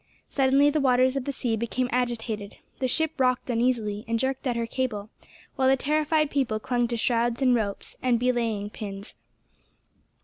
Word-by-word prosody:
Suddenly 275 +1 +3
the 305 - +1
waters 255 0 +3
of 270 -2 -2
the 280 - -1
sea 240 -3 -1
became 235 +3 -1
agitated. 230 -4 -2 0.2
The 260 - +1
ship 320 +3 -1
rocked 255 -1 +1
uneasily, 230 -3 0
and 230 0 +1
jerked 265 +2 -1
at 245 - 0
her 235 0 -1
cable, 230 -4 -3 0.5
while 260 - +3
the 270 - +4
terrified 305 +2 +1
people 255 -6 0
clung 240 +1 0
to 235 0 -2
shrouds 235 0 +1
and 255 -1 +5
ropes, 210 -4 -2
and 245 -2 +2
belaying 230 -4 0
pins. 200 -1 -7
245 Hz, 170 wpm, -26 LUFS, 225-265 Hz, 0.5 s, and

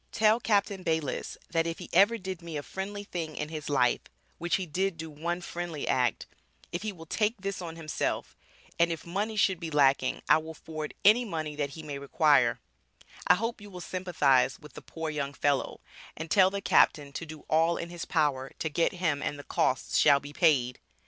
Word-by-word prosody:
Tell 220 0 +4
Captain 200 -4 +1
Bayliss 160 -5 -2
that 165 0 +1
if 165 - -3
he - - -8
ever 215 +4 +5
did 190 -3 -6
me 165 -2 -6
a 145 - -4
friendly 200 +4 -5
thing 165 -6 -5
in 150 - -4
his 155 -2 -6
life 125 -4 +2 0.4
which 175 0 +1
he 190 - -2
did 185 +2 -1
do 160 0 -7
one 170 +4 -3
friendly 175 -4 -5
act, 125 -2 +1 0.5
if 175 - -3
he 215 0 -3
will 165 -4 -12
take 210 +6 0
this 195 0 -4
on 165 -2 -6
himself, 160 -2 -3 0.4
and 170 0 +4
if 165 -2 -5
money 205 +6 -2
should 195 -4 +2
be 165 -2 -5
lacking 140 -3 +2
I - - +6
will 160 +1 -8
forward 155 -1 -7
any 220 +5 +7
money 160 -8 -4
that 145 -1 -1
he 160 - -8
may 145 -2 -5
require, 140 0 +3 0.7
I - - +7
hope 230 +3 -3
you 205 - -10
will 180 -2 -9
sympathize 155 -8 +1
with 150 -4 -14
the - - -9
poor 160 -1 -5
young 140 -2 -3
fellow, 140 -1 0 0.4
and 160 0 -6
tell 190 -2 +6
the 200 +1 -4
captain 145 -6 +3
to 165 - -5
do 155 -1 -9
all 165 +2 +3
in 170 - -5
his 175 -1 -6
power 140 -5 0
to 160 - -2
get 165 +5 +1
him 165 -6 0
and 145 - -2
the 145 - -9
costs 130 - 0
shall 140 -2 +6
be 145 +1 -10
paid. 140 -7 +2
165 Hz, 210 wpm, -29 LUFS, 150-185 Hz, 0.7 s, any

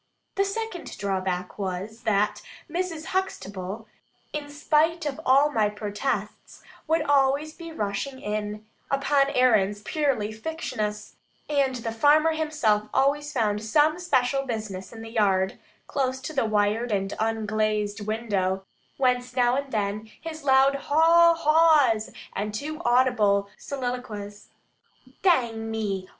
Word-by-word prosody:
The 395 - +2
second 395 -3 -5
drawback 185 -1 -2
was, 195 +4 -4
that 210 -1 +1 0.3
Mrs. 335 -1 -3
Huxtable, 210 - -3 0.5
in 295 -1 -4
spite 305 +3 +1
of 290 +1 -3
all 280 +3 +5
my 215 -6 +2
protests, 210 +5 -4 0.2
would 320 0 +2
be - - -8
always 285 +3 +2
rushing 215 +6 -3
in, 210 -1 -4 0.2
upon 275 0 +2
errands 210 -6 +2
purely 265 -7 0
fictitious; 215 -5 -4 0.3
and 275 -3 +1
the 230 -2 -4
farmer 300 +7 +4
himself 295 -10 0
always 290 +2 +1
found 210 -6 0
some 305 +8 +3
special 270 -6 +1
business 215 -7 -5
in 225 -1 -9
the 225 - -9
yard, 195 -4 +1 0.3
close 260 -2 -1
to 310 - -6
the 270 -5 +1
wired 215 +2 +1
and 195 -1 -1
unglazed 215 -1 -1
window, 195 -4 -1 0.3
whence 250 -1 0
every - - +4
now 245 +1 +3
and 275 0 -3
then 210 0 -2
his 315 -2 -7
loud 270 0 +5
haw 330 +4 +5
haws, 305 -8 +4 0.2
and 210 +1 -3
too 310 +7 -5
audible 225 -5 +3
soliloquies, 245 -6 -5 0.7
"Dang 235 - +2
me! 200 -4 -3
245 Hz, 130 wpm, -26 LUFS, 210-290 Hz, 0.7 s, all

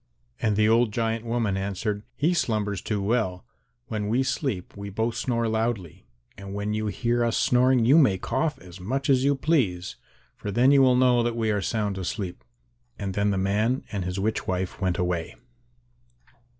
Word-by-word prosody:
And 105 -2 +1
the 105 +1 +3
old 115 0 +3
giant 115 +1 -1
woman 115 -4 0
answered, 100 +2 -2
"He 165 +5 +1
slumbers 105 - -1
too 105 -2 -2
well. 100 -4 -1 0.4
When 105 -3 -3
we 125 +4 +2
sleep 125 - -3
we 100 0 -6
both 110 +4 -1
snore 115 -2 -1
loudly, 110 -6 -2 0.3
and 100 0 -8
when 100 +1 -2
you 110 0 -1
hear 120 +3 0
us 115 -1 +1
snoring 125 -1 +3
you 140 +7 +6
may 105 -11 +4
cough 130 - -1
as 90 0 -13
much 135 +9 -1
as 130 -1 +3
you 140 +1 +3
please, 120 - 0 0.4
for 105 - -6
then 120 +7 +4
you 140 -1 +6
will 130 -1 +5
know 125 -1 +4
that 120 0 -1
we 110 -2 0
are 105 -1 0
sound 105 -2 -1
asleep." 90 - -4 0.5
Then 100 +1 -1
the 100 - 0
man 105 +7 +1
and 100 -4 -2
his 90 +2 -3
witch 110 +3 -1
wife 95 +1 -3
went 90 -2 0
away. 90 -2 -2
110 Hz, 180 wpm, -25 LUFS, 100-120 Hz, 0.5 s, you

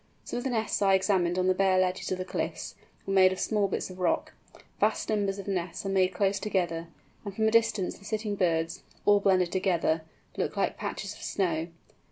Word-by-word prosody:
Some - - -5
of 245 - -3
the - - +1
nests 225 -4 -1
I 195 -1 +5
examined 185 -2 +1
on 185 - +2
the 185 - +4
bare 190 0 +3
ledges 185 0 0
of 185 - 0
the 185 - -4
cliffs, - - -4 0.3
were 195 - -2
made 185 -1 +6
of 190 - -4
small 210 -2 +1
bits 190 - -3
of 185 - -11
rock. 180 -2 0 0.5
Vast - - +1
numbers 205 -2 0
of 200 - -7
nests 180 -1 -3
are - - -1
made 190 -1 +3
close 195 +1 +1
together, 175 -5 -1 0.4
and 200 -3 -6
from 220 +1 +2
a - - +3
distance 220 -4 +2
the 200 - -16
sitting 215 0 -2
birds—all 175 +3 +1
blended 185 -3 +3
together—look 170 -4 -1
like - - +1
patches - - -4
of - - -14
snow. 165 -4 -1
190 Hz, 205 wpm, -28 LUFS, 180-200 Hz, 0.5 s, made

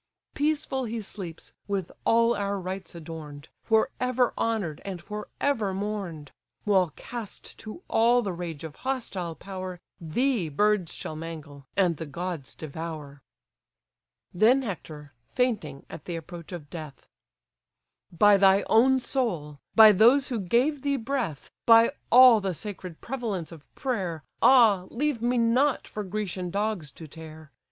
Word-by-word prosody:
Peaceful 290 -3 -1
he 230 0 -4
sleeps, 190 -5 -8
with 195 -4 -2
all 230 +1 +4
our 200 0 -2
rites 185 -1 -6
adorn'd, 155 -3 -9
For 220 -1 +2
ever 250 -1 +1
honour'd, 205 -10 -2
and 190 -3 -5
for 210 +4 -7
ever 220 -9 0
mourn'd: 190 -7 -4 0.3
While 190 -4 +3
cast 235 -4 -8
to 220 - -9
all 240 +2 +3
the 195 -3 -2
rage 170 -4 -6
of 160 -2 -8
hostile 200 -11 -3
power, 185 -1 -7 0.2
Thee 195 - 0
birds 205 +2 +1
shall 155 - -6
mangle, 155 -4 -8
and 180 -5 +3
the 160 - -6
gods 170 -1 -5
devour." 155 -2 -7 1.1
Then 240 +8 +4
Hector, 155 - -7 0.2
fainting 210 - -1
at - - -10
the 175 - -4
approach 170 +1 -9
of 155 -5 -8
death: 155 -4 -9 1.0
"By 205 +4 +5
thy 195 0 +5
own 260 +4 +4
soul! 175 - -2 0.2
by 220 -1 +10
those 240 +8 +5
who 240 -4 -2
gave 250 - +1
thee 280 0 0
breath! 230 - -3 0.2
By 230 +1 +7 0.2
all 245 -3 +8
the 190 -3 -2
sacred 185 -4 -8
prevalence 220 - -4
of 160 -3 -14
prayer; 190 - -3 0.2
Ah, 220 -8 +6
leave 280 -1 -1
me 245 +1 +1
not 250 +4 +2
for 210 - -5
Grecian 190 -2 -4
dogs 200 -4 -2
to 160 - -11
tear! 155 -1 -12
195 Hz, 145 wpm, -27 LUFS, 165-235 Hz, 1.1 s, by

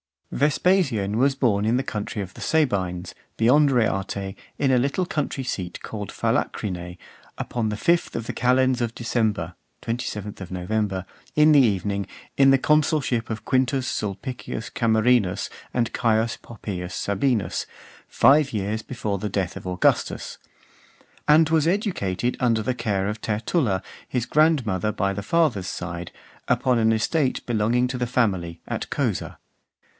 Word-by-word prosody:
II. - - -5
Vespasian 140 - +2
was 135 +2 +3
born 110 -7 +2
in 115 +3 +2
the 130 - 0
country 105 -3 -4
of 95 - -10
the - - -12
Sabines, 95 - 0 0.2
beyond 140 +6 +5
Reate, 100 -5 0 0.2
in 135 -2 +2
a 130 - +4
little 140 +8 0
country 145 -4 -2
seat 90 -8 -4
called 105 -3 -6
Phalacrine, 90 -3 -2 0.4
upon 120 -2 -2
the 105 - -3
fifth 170 +8 +1
of 115 - -3
the - - -4
calends 125 +1 +2
of 115 -1 -2
December 110 -7 -1 0.3
[27th 105 -5 -4
November], 95 +1 -2 0.3
in 150 +1 +6
the 145 - +7
evening, 100 -4 +1 0.3
in 135 0 +6
the 135 - +6
consulship 145 -5 +1
of 110 -1 -4
Quintus 130 0 +1
Sulpicius 110 +3 -4
Camerinus 110 -4 +2 0.2
and 120 -2 -1
Caius 115 0 +1
Poppaeus 95 -5 -6
Sabinus, 100 - 0 0.4
five 145 -1 +4
years 105 +1 -2
before 105 -5 -3
the 105 - -3
death 95 -2 -2
of - - -8
Augustus; 90 0 0 0.9
and 155 +1 +6
was 160 -1 +3
educated 125 - -1
under 115 -3 +2
the 130 - 0
care 105 -5 -1
of 105 +1 -4
Tertulla, 110 - 0 0.2
his 125 -2 -1
grandmother 125 - +2
by 100 -1 0
the 100 - -4
father's 120 - +1
side, 85 -1 -5 0.4
upon 125 -2 +2
an 110 0 +3
estate 130 +5 0
belonging 120 +2 +1
to 125 0 -4
the 125 - 0
family, 95 -9 0
at - - -4
Cosa. - - -2
115 Hz, 145 wpm, -24 LUFS, 100-130 Hz, 0.9 s, the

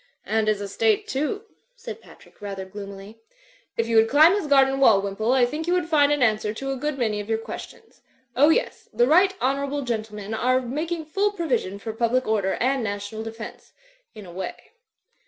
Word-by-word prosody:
"And 220 +1 0
his 210 -1 +1
estate, 215 +1 0
too," 305 +10 -2 0.3
said 465 -2 -9
Patrick, - - -19
rather 195 -2 -5
gloomily. 200 +2 -10 0.6
"If 230 - +1
you 230 -1 +2
would 220 0 +5
climb 310 +5 +6
his 405 -6 -1
garden 270 -1 +4
wall, 225 -7 +6
Wimpole, 200 +4 -1
I 260 -2 +4
think 300 +6 -4
you 350 - +2
would 360 -3 0
find 295 -3 +4
an 290 -3 +2
answer 215 -2 +1
to 270 +4 -4
a - - -2
good 295 +2 -3
many 220 -5 0
of 205 +1 -7
your 225 - +1
questions. 225 - -10 0.3
Oh, 290 +4 +5
yes, 320 - 0
the 240 - +3
right 370 +8 +4
honourable 280 +2 -1
gentle 220 -3 -3
men 210 +1 -6
are 255 +3 +2
making 310 +6 -3
ftill 405 +6 0
provision 245 - -1
for 220 +2 -6
public 240 +3 +1
order 205 -3 +1
and 260 +1 0
national 205 +1 -4
defence 225 0 -9 0.2
— - - -39
in 210 - -10
a 175 - -11
way." 185 +2 -7
245 Hz, 200 wpm, -24 LUFS, 215-295 Hz, 0.6 s, climb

